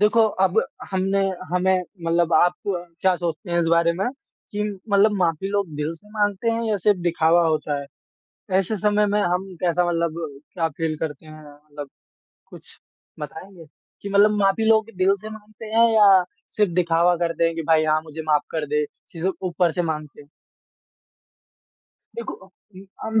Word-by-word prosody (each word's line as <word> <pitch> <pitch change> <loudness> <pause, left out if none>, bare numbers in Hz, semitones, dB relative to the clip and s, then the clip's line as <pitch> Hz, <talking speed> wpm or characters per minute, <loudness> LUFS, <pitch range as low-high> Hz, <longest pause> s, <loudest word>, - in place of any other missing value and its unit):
देखो 210 +2 +4 0.2
अब 185 - +3 0.3
हमने 195 +1 0 0.3
हमें 185 0 +2 0.2
मतलब 170 0 +1
आप 175 +3 +4
क्या 180 0 -1
सोचते 170 +1 -4
हैं 170 0 +2
इस 165 - 0
बारे 170 0 +4
में 195 - +1 0.4
कि 210 0 -2 0.3
मतलब 205 +1 +4
माफी 175 +1 0
लोग 200 -2 0
दिल 150 +2 -2
से 210 +5 -11
माँगते 205 +1 0
हैं 230 0 -1
या 215 -2 0
सिर्फ़ 205 -1 +3
दिखावा 170 0 +3
होता 150 -2 0
है? 140 - -9 0.7
ऐसे 195 +3 0
समय 210 +1 +2
में 205 +1 +1
हम 180 +1 0 0.2
कैसा 175 0 +2
मतलब 170 -1 -1 0.4
क्या 165 -3 0
फ़ील 160 +1 -3
करते 155 -1 -5
हैं? 155 0 -12
मतलब 145 -1 -10 0.6
कुछ - - -14 0.5
बताएँगे 165 +4 -9 0.4
कि 200 - -5
मतलब 200 +1 +5
माफ़ी 195 +2 +2
लोग 220 -1 +4
दिल 190 +1 +4
से 215 0 -8
माँगते 215 0 -11
हैं 230 0 +6
या 200 -3 +7 0.3
सिर्फ़ 210 -4 +2
दिखावा 175 0 +3
करते 170 0 0
हैं 165 - +1
कि 165 - -3
भाई 160 -1 +4
हाँ, 155 0 +2
मुझे 160 0 -8
माफ़ 150 -2 +2
कर 155 -2 -2
दे, 150 +1 0 0.3
सिर्फ़ 185 +3 -3
ऊपर 175 -1 +1
से 175 - -1
माँगते 155 -3 -5
हैं। 145 - -22 1.9
देखो 470 - -5
उ 200 - -18 0.2
अम, 220 0 +1
175 Hz, 170 wpm, -23 LUFS, 160-200 Hz, 1.9 s, या